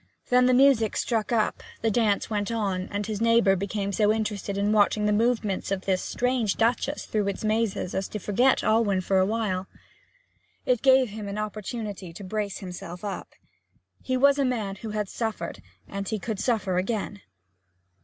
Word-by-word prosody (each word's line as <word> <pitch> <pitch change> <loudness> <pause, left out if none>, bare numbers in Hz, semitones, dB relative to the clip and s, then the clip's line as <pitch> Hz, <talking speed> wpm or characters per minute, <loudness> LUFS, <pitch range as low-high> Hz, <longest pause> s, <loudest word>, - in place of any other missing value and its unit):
Then 250 0 +5
the 255 - +4
music 255 -5 +4
struck 225 -2 -1
up, 220 -3 +1 0.2
the 225 - +2
dance 210 -2 +1
went 205 -1 -2
on, 195 -4 -2
and 205 0 -3
his 215 0 -4
neighbour 230 -4 +4
became 200 +1 -2
so 210 +2 +3
interested 210 -2 -2
in 200 +1 +1
watching 210 0 +3
the 210 - +2
movements 220 -3 0
of 195 -1 -1
this 190 -1 0
strange 245 -5 0
Duchess 245 +5 0
through 210 -2 -1
its 200 - -3
mazes 215 -4 0
as 190 0 -1
to - - -5
forget 235 +6 +2
Alwyn 215 -4 +2
for 190 +1 +2
a 185 - +3
while. 200 -4 -1 1.0
It 250 -3 +2
gave 260 -2 +5
him 210 0 -7
an 200 +1 -4
opportunity 215 -3 -5
to 200 - -9
brace 205 +1 -3
himself 180 0 -8
up. 200 - -6 0.7
He 255 0 -1
was 280 +2 +4
a - - +3
man 220 -7 -1
who 220 +3 -7
had 210 -1 -2
suffered, 220 +2 -4 0.3
and 200 0 -5
he 220 - -1
could 210 0 -4
suffer 200 -7 +1
again. 205 0 -3
210 Hz, 180 wpm, -26 LUFS, 195-230 Hz, 1.0 s, Then